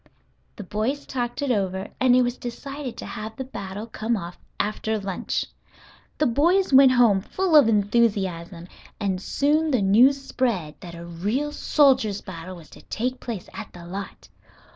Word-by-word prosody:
The 205 Hz, -, -7 dB
boys 220 Hz, +9 st, -2 dB
talked 245 Hz, +1 st, -3 dB
it 275 Hz, -, +1 dB
over, 190 Hz, -3 st, -1 dB
and 255 Hz, -1 st, +5 dB
it 255 Hz, -, +5 dB
was 245 Hz, 0 st, -1 dB
decided 275 Hz, +2 st, -6 dB
to -, -, -6 dB
have 220 Hz, -1 st, -6 dB
the 265 Hz, -, -4 dB
battle 205 Hz, -5 st, -7 dB
come 225 Hz, 0 st, -2 dB
off 175 Hz, -2 st, -8 dB, 0.2 s
after 215 Hz, +1 st, -1 dB
lunch. 195 Hz, -3 st, -3 dB, 0.7 s
The 305 Hz, -, +2 dB
boys 330 Hz, +8 st, +2 dB
went 265 Hz, -1 st, +8 dB
home 230 Hz, -6 st, +4 dB
full 365 Hz, -, 0 dB
of 290 Hz, -6 st, +8 dB
enthusiasm, 200 Hz, -5 st, 0 dB, 0.3 s
and 190 Hz, -3 st, -1 dB
soon 300 Hz, +8 st, +1 dB
the 255 Hz, -7 st, +2 dB
news 245 Hz, +8 st, +5 dB
spread 235 Hz, -, -2 dB
that 170 Hz, -1 st, -9 dB
a 170 Hz, 0 st, -9 dB
real 205 Hz, -, -2 dB
soldiers' 265 Hz, -9 st, +3 dB
battle 185 Hz, 0 st, -8 dB
was 165 Hz, -4 st, -14 dB
to -, -, -14 dB
take 250 Hz, +3 st, -3 dB
place 225 Hz, -7 st, -6 dB
at -, -, -8 dB
the 175 Hz, -1 st, -11 dB
lot. 195 Hz, +3 st, -7 dB
220 Hz, 165 wpm, -24 LUFS, 190-260 Hz, 0.7 s, went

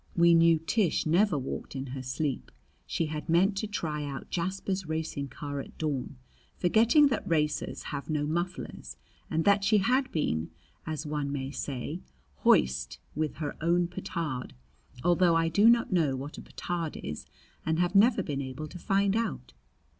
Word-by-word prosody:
We 170 Hz, 0 st, +6 dB
knew 165 Hz, 0 st, +6 dB
Tish 170 Hz, +3 st, +1 dB
never 175 Hz, +2 st, +3 dB
walked 135 Hz, +1 st, -5 dB
in 135 Hz, 0 st, -3 dB
her 135 Hz, -, -4 dB
sleep. 130 Hz, +2 st, -3 dB, 0.4 s
She 165 Hz, -, 0 dB
had 155 Hz, 0 st, -5 dB
meant 185 Hz, +5 st, +4 dB
to 215 Hz, -, -1 dB
try 155 Hz, -7 st, -3 dB
out 140 Hz, -2 st, -6 dB
Jasper's 190 Hz, +1 st, -2 dB
racing 160 Hz, -3 st, -3 dB
car 145 Hz, +1 st, -5 dB
at -, -, -9 dB
dawn, 145 Hz, -4 st, -3 dB, 0.4 s
forgetting 230 Hz, -, +5 dB
that 220 Hz, -5 st, -2 dB
racers 150 Hz, -2 st, 0 dB
have 140 Hz, +2 st, -5 dB
no 150 Hz, -1 st, 0 dB
mufflers, 165 Hz, -, -4 dB, 0.3 s
and 160 Hz, +3 st, 0 dB, 0.2 s
she 210 Hz, +2 st, +4 dB
had 255 Hz, +7 st, +2 dB
been, 80 Hz, -, -1 dB, 0.4 s
as 155 Hz, 0 st, -3 dB
one 150 Hz, -1 st, -2 dB
may 135 Hz, -1 st, -3 dB
say, 135 Hz, -3 st, -4 dB, 0.4 s
hoist 65 Hz, -1 st, +3 dB, 0.2 s
with 155 Hz, 0 st, -2 dB
her 150 Hz, -2 st, -4 dB
own 170 Hz, +2 st, +2 dB
petard 160 Hz, -7 st, -4 dB, 0.5 s
although 175 Hz, -1 st, +4 dB
I 165 Hz, 0 st, +2 dB
do 205 Hz, +7 st, +5 dB
not 235 Hz, -4 st, +3 dB
know 155 Hz, -7 st, +2 dB
what 140 Hz, +3 st, -6 dB
a -, -, -8 dB
petard 170 Hz, -3 st, -4 dB
is 75 Hz, -, -6 dB, 0.4 s
and 160 Hz, 0 st, 0 dB
have 175 Hz, +1 st, +1 dB
never 210 Hz, 0 st, +5 dB
been 140 Hz, -4 st, -3 dB
able 130 Hz, +3 st, -5 dB
to 180 Hz, -, -9 dB
find 195 Hz, +2 st, +2 dB
out. 230 Hz, 0 st, -2 dB
160 Hz, 165 wpm, -29 LUFS, 145-185 Hz, 0.5 s, We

